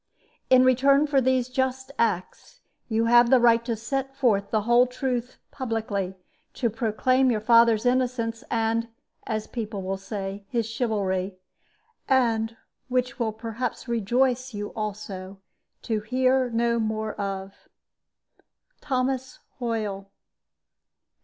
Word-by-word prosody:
"In 255 0 +7
return 275 +3 +4
for 285 -2 +2
these 255 -1 +2
just 260 +1 -2
acts, 225 - -2 0.3
you 225 0 +1
have 240 +1 +6
the 260 0 +6
right 235 -1 +4
to 235 -2 -1
set 270 +4 -3
forth 215 -7 +1
the 215 - +1
whole 240 +3 +4
truth 250 -1 -3
publicly, 220 -7 -3 0.4
to 235 -4 0
proclaim 255 +4 +2
your 225 -3 +1
father's 230 0 +4
innocence, 245 -2 0
and 230 0 0 0.4
(as 215 -2 -2
people 215 -4 -5
will 190 +1 -3
say) 195 0 -5
his 235 -3 0
chivalry; 200 -5 -1 0.7
and, 230 -3 +2 0.3
which 255 0 -1
will 225 -2 0
perhaps 225 +4 -5
rejoice 245 +2 0
you 205 0 -4
also, 200 -3 -6 0.4
to 220 -2 -1
hear 255 +3 +1
no 235 0 +1
more 220 -1 -2
of 195 -1 -6 1.1
"THOMAS 260 0 -1 0.2
HOYLE. 210 -5 -3
230 Hz, 120 wpm, -25 LUFS, 215-255 Hz, 1.1 s, In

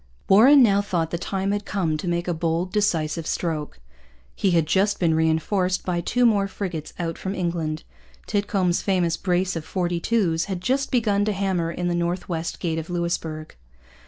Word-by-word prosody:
Warren 255 +8 +7
now 200 -3 +4
thought 175 -5 -2
the 170 - -2
time 195 +2 -2
had 205 0 -1
come 170 -6 -1
to 165 - -5
make 175 0 -1
a 175 - +1
bold, 165 +2 -1
decisive 165 -6 0
stroke. 155 - -3 0.6
He 195 - +1
had 170 -3 +3
just 195 +6 +1
been 170 -3 +2
reinforced 160 +4 +1
by 175 -2 -1
two 245 +7 +1
more 205 -4 +3
frigates 175 -6 -5
out 165 -2 -3
from 190 +1 -3
England. 170 -4 -2 0.4
Titcomb's 195 -3 0
famous 180 -4 +1
brace 180 -1 0
of 165 - -3
forty 175 0 -2
two's 170 -6 +1
had 190 -3 -4
just 265 +8 0
begun 210 -5 +2
to 210 - 0
hammer 190 -4 -1
in 175 +1 -3
the 175 - 0
North 175 +1 -1
West 165 -2 -3
Gate 165 -3 -1
of 160 - -7
Louisbourg. 170 -3 -3
175 Hz, 185 wpm, -24 LUFS, 165-200 Hz, 0.6 s, Warren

